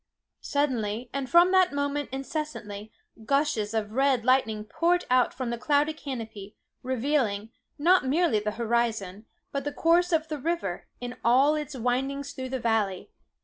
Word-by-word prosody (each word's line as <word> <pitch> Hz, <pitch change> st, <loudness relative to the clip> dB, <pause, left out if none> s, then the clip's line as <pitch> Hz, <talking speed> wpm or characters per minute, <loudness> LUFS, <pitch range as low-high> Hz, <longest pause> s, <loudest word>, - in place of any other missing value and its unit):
Suddenly, 245 Hz, -5 st, -1 dB
and 275 Hz, -2 st, -3 dB
from 345 Hz, +2 st, +6 dB
that 370 Hz, -4 st, +4 dB
moment 285 Hz, 0 st, -1 dB
incessantly, 265 Hz, -7 st, -5 dB, 0.3 s
gushes 275 Hz, -5 st, +1 dB
of 210 Hz, -1 st, -1 dB
red 265 Hz, -1 st, +2 dB
lightning 225 Hz, -5 st, +2 dB
poured 345 Hz, +11 st, +1 dB
out 255 Hz, -1 st, +4 dB
from 255 Hz, -3 st, -4 dB
the 235 Hz, -, -4 dB
cloudy 295 Hz, +3 st, +2 dB
canopy, 225 Hz, -9 st, -7 dB, 0.3 s
revealing, 250 Hz, -5 st, -1 dB, 0.3 s
not 350 Hz, +3 st, +4 dB
merely 305 Hz, -5 st, +2 dB
the 210 Hz, +1 st, -2 dB
horizon, 225 Hz, -4 st, -1 dB, 0.2 s
but 280 Hz, -1 st, -2 dB
the 290 Hz, -, -3 dB
course 345 Hz, +4 st, +3 dB
of 320 Hz, -1 st, +1 dB
the 305 Hz, -2 st, -4 dB
river, 310 Hz, -, -3 dB
in 245 Hz, 0 st, -6 dB
all 265 Hz, +6 st, +5 dB
its 300 Hz, -2 st, -4 dB
windings 270 Hz, +3 st, -1 dB
through 260 Hz, -1 st, -5 dB
the 260 Hz, 0 st, -2 dB
valley. 220 Hz, -5 st, -1 dB
260 Hz, 150 wpm, -27 LUFS, 225-295 Hz, 0.3 s, from